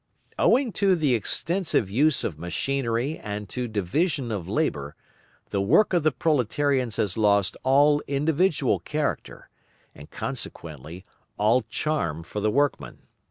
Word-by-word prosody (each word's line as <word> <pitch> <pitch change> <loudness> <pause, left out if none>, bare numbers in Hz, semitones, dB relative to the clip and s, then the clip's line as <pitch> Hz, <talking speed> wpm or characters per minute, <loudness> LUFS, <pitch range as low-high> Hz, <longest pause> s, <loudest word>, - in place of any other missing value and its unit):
Owing 255 -2 +3
to 195 -2 +4
the 150 -6 +1
extensive 160 - 0
use 145 +6 +3
of 75 -5 -4
machinery 120 - -2
and 105 0 -6
to 125 -1 -3
division 120 - -1
of 95 -6 -4
labour, 95 - -2 0.6
the 100 - 0
work 165 - +3
of 175 - +3
the 155 +1 +2
proletarians 130 -3 0
has 100 -2 -1
lost 100 -2 +3
all 145 +3 +4
individual 155 +5 +1
character, 150 -1 -4 0.5
and 75 - -13
consequently, 80 +4 -6 0.3
all 110 +5 +3
charm 140 - -2
for 105 - -6
the 105 +1 +1
workman. 140 +5 -1
130 Hz, 130 wpm, -25 LUFS, 100-150 Hz, 0.6 s, to